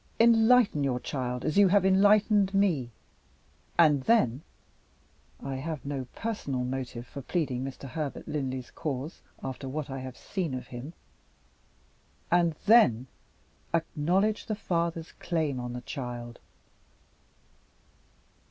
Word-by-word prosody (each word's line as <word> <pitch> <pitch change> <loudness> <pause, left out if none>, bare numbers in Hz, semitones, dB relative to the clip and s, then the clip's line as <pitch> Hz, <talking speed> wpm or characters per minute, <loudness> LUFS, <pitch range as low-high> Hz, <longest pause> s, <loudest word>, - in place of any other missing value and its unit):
Enlighten 230 - +5
your 130 -3 0
child 125 -1 -3
as 155 - +2
you 200 - +7
have 195 0 +4
enlightened 200 +1 +4
me; 170 -12 +2 0.9
and 150 -5 +5
then 140 - +3 1.0
I 135 -1 -3
have 155 +1 -5
no 140 -3 -3
personal 145 - -3
motive 125 -2 -4
for 140 - -8
pleading 135 -4 -1
Mr. 135 0 -7
Herbert 150 0 -5
Linley's 130 -4 -3
cause, 145 +1 -5 0.2
after 130 0 -5
what 145 0 -4
I 135 - -4
have 130 -1 -8
seen 175 -9 -3
of 125 - -7
him 125 +6 -7 1.4
and 170 -2 +3
then, 200 - +6 0.7
acknowledge 175 +6 0
the 215 - -1
father's 170 -4 -2
claim 160 -6 -2
on 125 0 -5
the 125 - -5
child." 120 -2 -6
150 Hz, 120 wpm, -28 LUFS, 130-190 Hz, 1.4 s, you